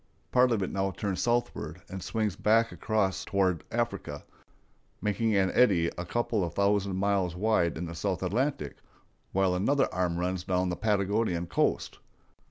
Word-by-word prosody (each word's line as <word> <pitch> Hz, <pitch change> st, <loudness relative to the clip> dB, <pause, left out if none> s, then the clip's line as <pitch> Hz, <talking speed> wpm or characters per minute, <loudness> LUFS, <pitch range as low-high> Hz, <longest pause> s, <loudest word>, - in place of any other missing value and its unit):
Part 125 Hz, 0 st, +4 dB
of 110 Hz, -4 st, +1 dB
it -, -, -3 dB
now 95 Hz, 0 st, 0 dB
turns 95 Hz, -1 st, -3 dB
southward 120 Hz, +3 st, -1 dB
and 95 Hz, 0 st, -7 dB
swings 110 Hz, -3 st, -1 dB
back 115 Hz, +2 st, +3 dB
across 105 Hz, -4 st, 0 dB
toward 95 Hz, -5 st, +1 dB
Africa, 75 Hz, 0 st, -2 dB, 0.8 s
making 110 Hz, +1 st, 0 dB
an 95 Hz, -1 st, +3 dB
eddy 90 Hz, -9 st, +4 dB
a 85 Hz, -, -5 dB
couple 115 Hz, +1 st, 0 dB
of 85 Hz, -1 st, -4 dB
thousand 100 Hz, -1 st, +1 dB
miles 95 Hz, -2 st, 0 dB
wide 90 Hz, -4 st, +1 dB
in 85 Hz, -, -3 dB
the 85 Hz, -, -6 dB
South 95 Hz, +1 st, -2 dB
Atlantic, 105 Hz, -, -1 dB, 0.5 s
while 95 Hz, -1 st, +2 dB
another 135 Hz, +10 st, +2 dB
arm 90 Hz, -2 st, 0 dB
runs 90 Hz, 0 st, -1 dB
down 90 Hz, 0 st, 0 dB
the 90 Hz, -, -1 dB
Patagonian 100 Hz, -3 st, 0 dB
coast. -, -, 0 dB
95 Hz, 160 wpm, -29 LUFS, 90-110 Hz, 0.8 s, Part